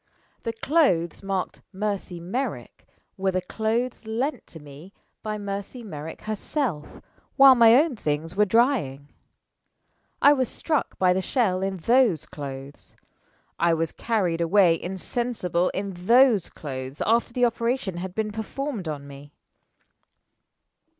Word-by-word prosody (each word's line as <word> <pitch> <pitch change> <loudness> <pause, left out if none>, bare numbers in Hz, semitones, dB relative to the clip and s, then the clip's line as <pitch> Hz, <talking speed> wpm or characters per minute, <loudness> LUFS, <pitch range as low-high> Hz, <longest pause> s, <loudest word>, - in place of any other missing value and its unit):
The 230 - -3
clothes 225 - +1
marked 195 -2 -3
'Mercy 195 -3 -3
Merrick' 220 +11 -5 0.3
were 190 0 0
the 185 -1 0
clothes 225 +5 -2
lent 250 +7 -2
to 160 - -11
me 150 +6 -13 0.3
by 215 -1 -3
Mercy 200 +4 -6
Merrick 160 -6 -8
herself 215 - -3 0.3
while 270 -1 +9
my 230 -2 +7
own 295 0 +3
things 155 -3 -3
were 210 +1 +4
drying. 195 - +1 1.1
I 285 - +7
was 260 -4 0
struck 310 -3 -2
by 185 -1 +4
the 190 - 0
shell 190 -3 0
in 195 0 -2
those 230 - +3
clothes. 140 -1 -9 0.6
I 170 -1 +3
was 165 0 -1
carried 185 -8 -1
away 170 -1 +4
insensible 185 -1 -2
in 195 +1 -4 0.2
those 240 -6 +5
clothes 130 -1 -6
after 230 +2 +2
the 245 +1 +2
operation 230 -5 -1
had 185 +1 -6
been 215 -1 -1
performed 220 - -4
on 145 -2 -5
me." 140 +1 -13
195 Hz, 130 wpm, -25 LUFS, 165-235 Hz, 1.1 s, while